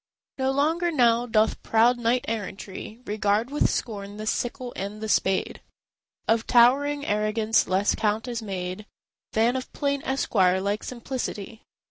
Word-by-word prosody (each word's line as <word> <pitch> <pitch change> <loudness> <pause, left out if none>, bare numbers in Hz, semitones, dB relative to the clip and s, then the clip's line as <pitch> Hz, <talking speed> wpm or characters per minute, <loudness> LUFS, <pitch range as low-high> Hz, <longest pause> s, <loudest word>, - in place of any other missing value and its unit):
No 265 0 +1
longer 315 +6 +1
now 240 -5 +3
doth 220 -1 +2
proud 235 +2 +3
knight 240 +1 +1
errantry 210 -1 -5
Regard 210 +3 0
with 295 - +2
scorn 205 -3 -4
the 215 - -5
sickle 245 +2 -2
and 200 +2 -5
the 220 - -4
spade; 190 -2 0 0.7
Of 225 0 +2
towering 285 +4 +4
arrogance 215 +1 +1
less 190 +2 +2
count 220 +2 -1
is 240 -2 -3
made 190 0 -5 0.5
Than 230 +3 +2
of 260 0 -4
plain 280 -1 -1
esquire 190 -9 +2
like 200 +2 -2
simplicity. 235 -3 -5
225 Hz, 140 wpm, -25 LUFS, 210-250 Hz, 0.7 s, towering